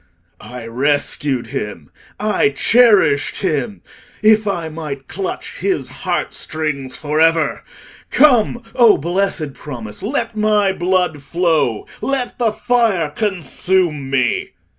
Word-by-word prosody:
"I 125 -2 -9
rescued 135 +1 -1
him—I 105 - -3
cherished 205 -12 +4
him—if 210 +5 0
I 170 -5 -1
might 150 -4 -7
clutch 190 +1 -5
his 385 -2 -1
heart - - -3
strings 140 -5 -3
for 150 0 -2
ever! 165 -1 +2 0.5
Come, 245 -4 +4
O 235 -4 +6
blessed 175 -2 -1
promise! 120 -8 -8
Let 230 0 -2
my 210 -2 +2
blood 180 -4 0
flow; 155 -7 0 0.2
let 270 -3 -2
the 230 -3 +2
fire 220 -9 +1
consume 175 -5 0
me!" 125 -4 0
170 Hz, 105 wpm, -18 LUFS, 140-215 Hz, 0.5 s, O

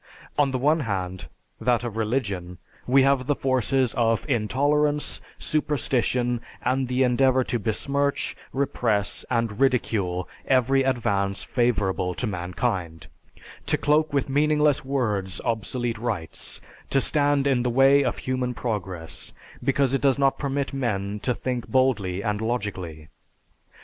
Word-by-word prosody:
On 145 -2 +3
the 130 - -1
one 150 +5 +3
hand, 95 - -3 0.3
that 120 -1 +1
of 120 -3 -4
religion, 105 -6 -2 0.3
we 135 +2 +5
have 135 -2 +2
the 145 - +2
forces 130 -1 +1
of 115 +1 +1
intolerance, 145 +5 +1 0.2
superstition, 125 -5 0 0.2
and 130 +1 +1
the 125 +1 +2
endeavor 130 +1 +3
to 120 - -2
besmirch, 140 +6 -1 0.2
repress, 115 -7 0
and 115 -3 -1
ridicule 105 -9 +1 0.2
every 135 +1 +3
advance 100 -7 0
favorable 100 -7 0
to - - -2
mankind; 90 -3 -3 0.6
to - - +2
cloak 150 +1 +2
with 140 -2 0
meaningless 150 +1 +2
words 105 -9 -1
obsolete 115 0 -1
rites, 105 -9 -4 0.3
to 135 - +3
stand 145 0 +2
in 135 -3 +2
the 125 - 0
way 135 +3 +5
of 125 - -1
human 130 -1 -2
progress, 95 -8 -4 0.3
because 135 -1 +2
it 135 - +1
does 135 -2 +3
not 135 -1 +2
permit 140 -1 -2
men 105 -6 -2
to 125 +3 -1
think 125 -2 -3
boldly 105 -8 +1
and 105 -1 -1
logically. 95 -9 -3
125 Hz, 135 wpm, -25 LUFS, 105-135 Hz, 0.6 s, we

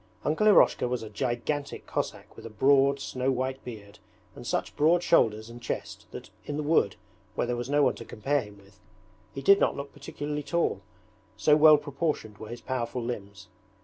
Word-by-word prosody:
Uncle 160 +8 +2
Eroshka 200 -10 +5
was 125 -2 -2
a 110 - -9
gigantic 130 +5 -3
Cossack - - -4
with - - -12
a 115 - -7
broad, 135 +5 +3
snow 130 -1 -2
white 130 +1 -3
beard 105 -4 -10 0.3
and - - -10
such - - -2
broad 170 +4 +3
shoulders 110 -8 +3
and 120 +1 -11
chest 115 - -5
that - - -10
in 145 +4 -4
the 150 - -2
wood, 145 - +2 0.4
where - - 0
there 120 0 -1
was 120 +1 -5
no 145 0 +3
one 130 - +3
to - - -9
compare 140 +6 -1
him 105 -3 -12
with, 100 0 -21 0.5
he 135 - -7
did 200 +6 +6
not - - +2
look 140 0 -7
particularly 150 0 -5
tall, 145 - -1 0.6
so 150 +6 +4
well 155 0 +8
proportioned 145 -7 -3
were 110 - -8
his 120 - -7
powerful 125 -1 -3
limbs. 100 -5 -6
130 Hz, 190 wpm, -28 LUFS, 115-145 Hz, 0.6 s, well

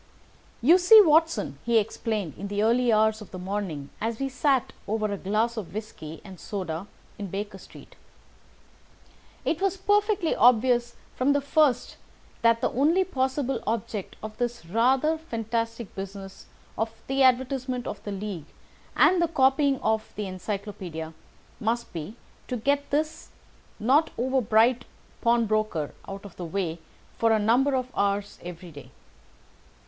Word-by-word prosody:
"You 335 +8 +7
see, 395 +5 +9
Watson," 315 - +3
he 235 -1 +3
explained 210 -4 -1
in 200 - -6
the 205 +1 -1
early 240 +2 +3
hours 220 0 +3
of 210 - -10
the 185 - -8
morning 180 -7 -4
as 225 +1 -1
we 275 0 -1
sat 270 -1 +1
over 215 +1 -1
a - - -1
glass 215 +5 -1
of 200 -3 -6
whisky 165 -7 -7
and 190 -3 -11
soda 185 -2 -5 0.3
in 200 - -4
Baker 195 +1 -5
Street, - - -15 1.5
"it 330 - 0
was 390 0 +1
perfectly 410 -2 +2
obvious 240 0 +4 0.2
from 270 +3 +2
the 285 - +2
first 280 -3 +1 0.4
that 230 0 +4
the - - +1
only 320 +8 +3
possible 265 -4 -1
object 215 -2 -3
of 215 0 -6
this 240 -5 -2
rather 260 - +2
fantastic 230 - -3
business 195 0 -8 0.3
of 225 +1 +1 0.2
the 270 +1 0
advertisement 255 -1 +2
of - - -6
the 205 - -5
League, 195 -6 -5 0.5
and 365 -1 +5
the 340 - +3
copying 270 -2 +3
of 220 0 0
the 210 - -3
Encyclopædia, 185 -4 -5 0.5
must 235 +2 -2
be 170 +6 -6 0.3
to 250 - -2
get 280 +5 0
this 310 +2 -2 0.5
not 275 +9 +3
over 260 +2 +1
bright 235 +3 +3 0.4
pawnbroker 215 -9 +1
out 195 +1 -7
of 200 - -11
the 180 - -5
way 170 -1 -3 0.4
for 230 0 +3
a 220 - +5
number 245 +6 +3
of 255 0 -3
hours 200 0 -1
every 175 0 -9
day. 145 -2 -12
230 Hz, 150 wpm, -26 LUFS, 200-265 Hz, 1.5 s, see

